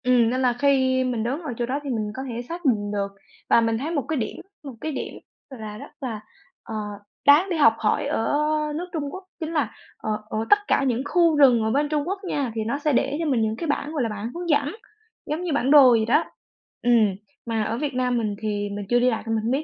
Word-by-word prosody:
Ừm, 245 -2 +4
nên 255 +2 -1
là 250 -2 +3
khi 260 -2 +3
mình 245 -3 -1
đứng 265 +8 -2
ở 300 -7 -5
chỗ 240 - 0
đó 265 +4 -2
thì 285 - -5
mình 215 -4 -2
có 260 - -4
thể 235 0 -4
xác 335 +7 -8
định 205 -6 +1
được, 200 -1 -1 0.4
và 235 - +6
mình 225 0 +1
thấy 290 +7 -3
một 290 -5 -1
cái 315 0 -1
điểm 220 -4 -3 0.3
một 275 -3 -7
cái 315 - -2
điểm 275 - -5 0.4
là 215 -5 -8
rất - - -10
là, 235 -5 -4 0.4
ờ, 220 - -7 0.5
đáng 290 +6 +7
để 345 - -1
học 230 -7 +6
hỏi 210 - +1
ở 225 - 0 0.5
nước 340 +3 -3
Trung 315 -3 -2
Quốc, 375 - -7 0.2
chính 325 -1 -4
là, 285 -8 0 0.3
ờ, - - -5 0.2
ở - - -3
tất 410 - +8
cả - - +2
những 250 -2 +1
khu 335 -1 +3
rừng 250 -6 +6
ở 220 - +1
bên 290 +4 +1
Trung 300 -1 0
Quốc 390 +2 -2
nha, 285 -9 -2
thì 220 - -1
nó 240 - 0
sẽ 295 0 +1
để 275 +3 +1
cho 335 - -1
mình 260 -7 +1
những 220 0 0
cái 330 - -4
bảng, 290 0 -1
gọi 290 -5 0
là, 230 - -1
bảng 210 +2 -5
hướng 345 0 -5
dẫn, 290 +1 +1 0.5
giống 310 +4 -3
như 345 -4 -1
bản 275 -1 +1
đồ 285 -4 +9
vậy 225 -2 +3
đó. 275 +8 +3 0.6
Ừm, 225 -5 +3 0.3
mà 225 -2 -1
ở 225 +2 -2
Việt 285 +1 -2
Nam 250 -1 +1
mình 215 -3 -1
thì 205 -1 -2
mình 205 -1 -5
chưa 245 - +4
đi 250 +1 +4
lạc 225 - -2
nên 225 - 0
mình 220 - -1
hông 230 - 0
biết 275 +4 0
255 Hz, 265 wpm, -24 LUFS, 225-295 Hz, 0.6 s, đồ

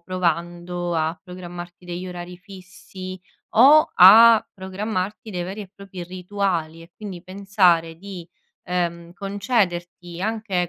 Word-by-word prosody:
provando 175 0 -2
a 160 +1 -1
programmarti 175 -1 -10
degli 175 +1 -6
orari 175 0 -8
fissi, 185 -1 -11 0.3
o 285 +7 +7
a 220 +4 +8
programmarti 195 +2 -4
dei 180 -2 -3
veri 190 +4 -6
e 195 -3 -9
propri 195 -2 -9
rituali, 180 -3 -3
e 165 +1 -15
quindi 195 -5 -8
pensare 185 -4 +1
di, 185 -2 -9 0.4
ehm, 170 -1 -3
concederti 185 -4 -2
anche 205 -5 -1
180 Hz, 120 wpm, -22 LUFS, 175-200 Hz, 0.4 s, a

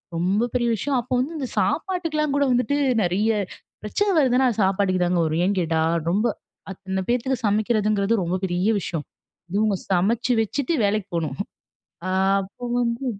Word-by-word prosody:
ரொம்ப 195 +8 +1
பெரிய 240 -1 +1
விஷயம். 275 +5 -1
அப்போ 255 +2 -5
வந்து 305 +6 -2
இந்த 260 - -2
சாப்பாட்டுக்குலா 325 -1 0
கூட 285 - +3
வந்துட்டு 270 +4 +1 0.3
நெறைய 195 +5 +1 0.5
பிரச்சன 395 - 0
வருதுன்னா, 260 -1 +3
அது 220 - -3
சாப்பாட்டுக்கு 190 -1 +1
தாங்க 175 0 +1
வரும். 160 +3 0
ஏன் 200 -1 0
கேட்டா 160 -2 0 0.3
ரொம்ப 205 +6 +1 0.5
அத்தன 190 0 -4
பேத்துக்கு 250 +2 0
சமைக்கிறதுங்கிறது 215 0 +1
ரொம்ப 175 +2 -1
பெரிய 180 +3 0
விஷயம். 160 -3 -4 0.5
இவங்க 210 -1 +2 0.2
சமைச்சு 225 +7 +2
வெச்சுட்டு 280 +8 -1
வேலைக்கு 200 -1 0
போணும். 155 -5 -2
ம். - - -5 0.6
ஆ - - -1 0.3
அப்போ 200 +6 -9
வந்து 235 +2 -1
215 Hz, 155 wpm, -23 LUFS, 185-250 Hz, 0.6 s, கூட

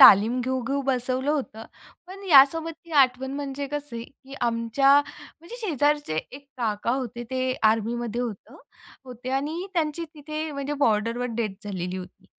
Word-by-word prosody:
तालीम 225 +6 +8
घेऊ-घेऊ 260 +2 -1
बसवलं 255 +2 0
होतं. 250 -7 -3 0.4
पण 385 +2 -10
यासोबत 315 +2 +6
ती 335 - -16
आठवण 260 +1 -1
म्हणजे 280 0 -4
कसं 290 -4 -5
आहे, 230 - -5
की 275 0 -14
आमच्या, 235 +3 +3 0.5
म्हणजे 345 +9 -9
शेजारचे 295 - +1
एक 280 +1 -11
काका 220 -2 -1
होते. 245 -2 -3
ते 255 0 0 0.2
आर्मीमध्ये 235 +1 -1
होतं 230 -5 -6 0.5
होते 250 0 -7
आणि 325 +6 -4
त्यांची 330 0 0
तिथे 305 +1 -5
म्हणजे 280 0 -3
बॉर्डरवर 230 +3 +1
डेथ 215 -4 -1
झालेली 185 -2 -3
होती 185 -1 -10
260 Hz, 145 wpm, -25 LUFS, 230-290 Hz, 0.5 s, तालीम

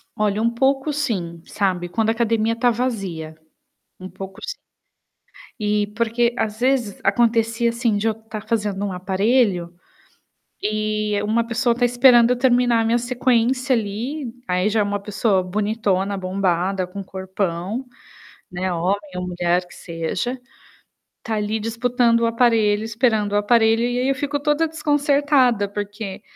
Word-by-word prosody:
Olha, 210 -1 0
um 230 - +3
pouco, 270 +4 +1
sim, 190 - -3
sabe. 185 -3 -1
Quando 220 +4 0
a - - +4
academia 230 -1 +1
está 240 +2 +2
vazia. 195 -10 -3 0.6
Um 185 - -8
pouco 195 0 -9
sim. - - -5 1.1
Eh, 210 0 +1
porque 235 +1 +1
às 215 0 -2
vezes 250 -6 0
acontecia, 230 +2 +2
assim, 230 -2 0
de 210 +2 -1
eu 220 - +2
estar 220 -1 -9
fazendo 205 -3 -1
um 195 - -3
aparelho, 190 -1 +1 0.9
e 215 -1 -1
uma 225 +2 0
pessoa 240 +1 +1
está 245 +1 0
esperando 240 -1 +5
eu 250 - +3
terminar 245 -2 +3
a 225 - +1
minha 230 +2 +2
sequência 250 +1 +1
ali. 230 +6 -4 0.2
Aí 180 +3 +1
já 220 +1 +1
é - - +4
uma 205 0 -1
pessoa 200 -1 +1
bonitona, 200 0 -1
bombada, 185 0 -1
com 190 +3 -8
um - - -7
corpão, 190 +4 -3 0.7
né, 185 +1 -2
homem 180 +4 0 0.2
ou 180 0 -3
mulher, 175 0 0
que 175 - -15
seja, 175 +10 -4 0.8
tá 225 - -2
ali 210 +1 -1
disputando 230 +1 +1
o 230 - +2
aparelho, 225 -3 +2
esperando 220 -2 +1
o - - +2
aparelho. 225 +2 +3
E 245 +1 0
aí, 255 +1 0
eu 275 - +2
fico 290 +2 -2
toda 295 +2 +1
desconcertada, 285 -7 +2
porque 205 0 -6
220 Hz, 155 wpm, -21 LUFS, 195-240 Hz, 1.1 s, esperando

